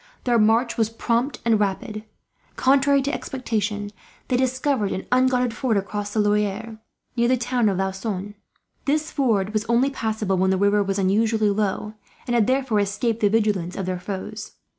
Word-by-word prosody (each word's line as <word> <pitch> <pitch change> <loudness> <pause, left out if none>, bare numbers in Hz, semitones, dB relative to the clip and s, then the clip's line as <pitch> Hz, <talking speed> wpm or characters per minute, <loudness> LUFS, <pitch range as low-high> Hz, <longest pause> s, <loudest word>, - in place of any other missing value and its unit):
Their 240 -2 +2
march 225 +3 +3
was 220 -2 +2
prompt 235 +4 -1
and 225 -2 +3
rapid. 210 +2 -2 0.5
Contrary 275 +1 +3
to 285 +2 -2
expectation, 215 -5 -3 0.4
they 250 - +2
discovered 260 -4 0
an 190 - -4
unguarded 250 -1 +2
ford 235 -4 0
across 205 +1 -3
the 215 - -1
Loire, 210 +1 0 0.4
near 235 -1 +2
the 255 +1 +3
town 240 -2 +1
of 190 - -1
Laussonne. 190 +1 -3 0.5
This 305 +2 0
ford 215 -7 +1
was 215 -1 0
only 235 +4 +2
passable 215 -6 -1
when 190 0 +3
the 190 - +2
river 200 +1 +3
was 195 0 -1
unusually 210 +2 +2
low, 210 +1 -1 0.3
and 240 - -2
had 230 -3 +3
therefore 260 -5 +1
escaped 210 +3 -1
the 205 - +3
vigilance 205 -5 0
of 195 - -3
their 185 -1 -3
foes. 205 +3 -6
215 Hz, 170 wpm, -23 LUFS, 205-245 Hz, 0.5 s, march